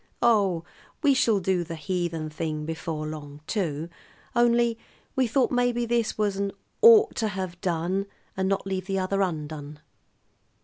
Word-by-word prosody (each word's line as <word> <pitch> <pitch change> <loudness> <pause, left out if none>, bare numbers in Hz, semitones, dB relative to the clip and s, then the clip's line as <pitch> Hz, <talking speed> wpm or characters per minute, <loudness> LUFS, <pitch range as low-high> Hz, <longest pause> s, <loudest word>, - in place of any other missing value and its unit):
Oh, 200 -8 +3 0.4
we 285 -2 +6
shall 225 -5 +3
do 185 -1 +1
the 165 0 -6
heathen 160 -3 -3
before 160 -1 -4
long, 150 -1 -7
too; 165 -7 -2 0.5
only 235 -1 +3 0.4
we 260 -2 +3
thought 255 +3 +2
maybe 245 -1 +1
this 235 -1 0
was 205 -2 0
an 200 0 -1 0.3
'ought 445 -2 +8
to 220 - +1
have 185 -4 -5
done 180 +3 -1 0.3
and 190 0 0
not 195 0 0
leave 190 -1 -3
the 195 -1 -1
other 195 +1 0
undone.'" 150 -4 -3
190 Hz, 145 wpm, -26 LUFS, 160-230 Hz, 0.5 s, ought